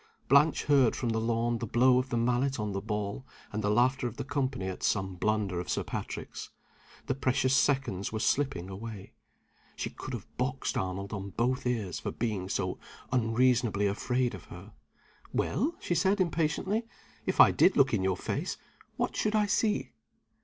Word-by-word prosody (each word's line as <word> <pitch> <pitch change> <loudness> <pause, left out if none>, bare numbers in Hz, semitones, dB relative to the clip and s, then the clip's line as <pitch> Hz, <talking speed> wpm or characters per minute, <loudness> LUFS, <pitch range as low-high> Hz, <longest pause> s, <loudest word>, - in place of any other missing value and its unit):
Blanche 140 +4 +5
heard 140 -5 +4
from 120 - -2
the 110 0 +1
lawn 115 +1 0
the 115 - -3
blow 125 +3 +4
of 130 +1 -3
the 120 - -1
mallet 125 +2 +1
on 105 -1 -2
the 95 0 -3
ball, 105 +2 -3 0.3
and 110 +1 -3
the 105 - +1
laughter 125 +4 +2
of 120 - -8
the - - -3
company 135 -6 -2
at 95 - -5
some 95 -2 0
blunder 100 -1 0
of 90 - -5
Sir - - 0
Patrick's. - - -6 0.6
The - - 0
precious 130 0 +1
seconds 130 -11 +1
were 110 - -3
slipping 130 -9 0
away. 100 +1 -8 0.6
She - - -4
could 130 -1 -6
have 110 - -7
boxed 130 +1 -1
Arnold 95 +2 -3
on 100 -1 -4
both 125 +6 0
ears 110 -8 -1
for - - -3
being 105 -6 -2
so 95 -2 -2 0.3
unreasonably 115 -3 +2
afraid 120 +5 0
of 95 - -9
her. - - -11 0.6
"Well," 300 - 0
she - - -1
said, 190 +4 +2
impatiently, 185 +6 0 0.4
"if - - -1
I - - +9
did 190 - +4
look 135 -3 +4
in 100 -4 +1
your 95 -1 +1
face, - - -3 0.4
what - - -1
should 215 0 0
I 210 -1 +4
see?" 210 +1 +1
120 Hz, 180 wpm, -30 LUFS, 105-135 Hz, 0.6 s, I